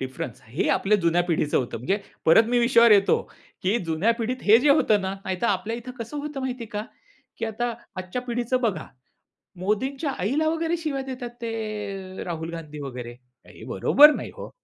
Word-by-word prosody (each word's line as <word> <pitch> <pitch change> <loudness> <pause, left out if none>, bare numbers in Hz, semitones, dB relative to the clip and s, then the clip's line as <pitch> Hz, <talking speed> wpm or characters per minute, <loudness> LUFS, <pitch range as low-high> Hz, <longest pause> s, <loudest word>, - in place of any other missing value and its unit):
Difference 130 -3 -6
हे 120 +8 -2
ही - - 0
आपल्या 210 +2 +3
जुन्या 170 0 +2
पिढीचं 160 -4 0
होतं. 125 -3 -3
म्हणजे 165 - 0 0.3
परत 165 +8 +7
मी 245 0 +2
विषयावर 235 -1 +5
येतो, 200 -1 +4 0.4
की 195 +5 +2
जुन्या 165 +8 +2
पिढीत 250 +2 -3
हे 215 +2 +7
जे 295 - +3
होतं 220 -7 +4
ना 190 0 -3
नाहीतर 190 +4 -1
आपल्या 205 +3 -1
इथे 240 +2 -8
कसं 230 +5 -6
होतं 290 -1 -5
माहिती 255 -2 -3
आहे - - -11
का, 210 +1 -3 0.5
की - - -2
आता 235 +2 -2 0.2
आजच्या 185 +7 -4
पिढीचं 245 +1 -1
बघा 225 -6 -1 0.7
मोदींच्या 265 - -1
आईला 280 +12 +1
वगैरे 330 +1 0
शिव्या 305 -5 -3
देतात 255 -2 -6
ते 210 -4 -5
राहुल 165 -1 -4
गांधी 155 -2 -8
वगैरे 125 -4 -6 0.4
हे - - -13
बरोबर 295 +2 +6
नाही - - -5
हो. - - -8
220 Hz, 185 wpm, -25 LUFS, 185-250 Hz, 0.7 s, परत